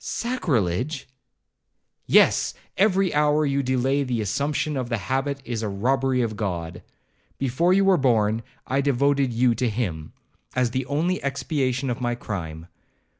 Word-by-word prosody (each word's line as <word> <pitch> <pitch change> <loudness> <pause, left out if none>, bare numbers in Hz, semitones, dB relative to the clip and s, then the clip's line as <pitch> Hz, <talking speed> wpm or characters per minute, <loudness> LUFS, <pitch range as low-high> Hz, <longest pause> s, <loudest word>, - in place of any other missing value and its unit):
'Sacrilege!' 140 - -1 1.0
'Yes; - - +4 0.2
every 195 -2 +2
hour 150 +1 +3
you 140 0 +1
delay 130 +2 +1
the 125 -4 -1
assumption 140 +8 -1
of 130 -3 -3
the 115 - 0
habit 135 +7 -2
is 115 -2 -3
a 110 - -2
robbery 130 +5 +1
of 110 -2 -2
God. 85 -5 -4 0.6
Before 135 +7 +1
you 195 +1 +4
were 190 -2 +5
born, 115 -5 +2 0.2
I 135 +2 0
devoted 140 -1 +2
you 120 +1 +3
to 120 +2 0
him, 90 -9 -3 0.4
as 125 -2 +1
the 130 +1 -2
only 165 +6 0
expiation 135 -2 -1
of 120 - -4
my 120 -1 0
crime. 85 -8 -6
130 Hz, 145 wpm, -24 LUFS, 115-140 Hz, 1.0 s, were